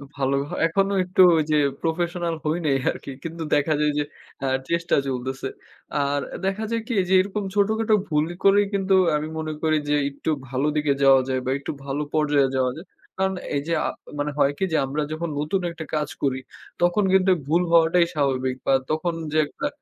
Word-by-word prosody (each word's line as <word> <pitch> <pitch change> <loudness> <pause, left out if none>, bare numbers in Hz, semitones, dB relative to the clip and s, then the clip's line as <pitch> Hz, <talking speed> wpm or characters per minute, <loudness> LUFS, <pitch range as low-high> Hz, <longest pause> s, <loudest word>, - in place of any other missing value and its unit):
ভাল 135 -1 0 0.3
এখনো 195 +4 +1
একটু 185 +1 +2 0.2
ওই 155 - +3
যে, - - +4 0.3
professional 170 +1 -1
হয় 160 +3 0
নাই 140 - +3 0.2
আরকি। - - -8
কিন্তু 165 0 -5
দেখা 150 +2 +2
যায় 150 - +3
যে, - - +2 0.4
আ - - 0 0.2
চেষ্টা 170 +1 +1
চলতেছে। 130 +1 -3 0.6
আর 140 +1 0 0.3
দেখা 195 +3 -1
যায় 230 -1 0
কি 250 - -2 0.2
যে, - - +2
এরকম 200 +1 -3
ছোটখাটো 215 +2 +2
ভুল 150 0 +2 0.2
করেই 200 +1 +5
কিন্তু 195 -1 +2 0.2
আমি 150 +1 -2
মনে 155 -1 -3
করি 155 -1 +3
যে, 150 - +3
একটু 140 +3 -5 0.2
ভালো 135 +3 0
দিকে 150 -2 +2
যাওয়া 135 -1 +7
যায় 130 -1 0
বা - - -1
একটু - - -5
ভালো 140 +2 -2
পর্যায়ে 145 -3 +3
যাওয়া 130 -1 +1
যায় 170 - -9 0.3
কারণ 190 0 0 0.2
এই 140 - +1
যে, 170 - 0
আ - - 0 0.3
মানে 145 +1 -1
হয় 140 0 +3
কি - - -2
যে, 160 - +2
আমরা 145 +3 -2
যখন 160 +1 -3
নতুন 155 +6 -1
একটা 160 -2 -7
কাজ 150 -1 -1
করি 130 -2 +1 0.4
তখন 175 +4 +3
কিন্তু 190 0 +4 0.2
ভুল 165 +4 +3
হওয়াটাই 170 +1 +5
স্বাভাবিক 130 -3 0
বা 135 - +4 0.2
তখন 165 +2 0 0.2
যে, 155 - +3
একটা 280 - -4
155 Hz, 195 wpm, -24 LUFS, 140-180 Hz, 0.6 s, যাওয়া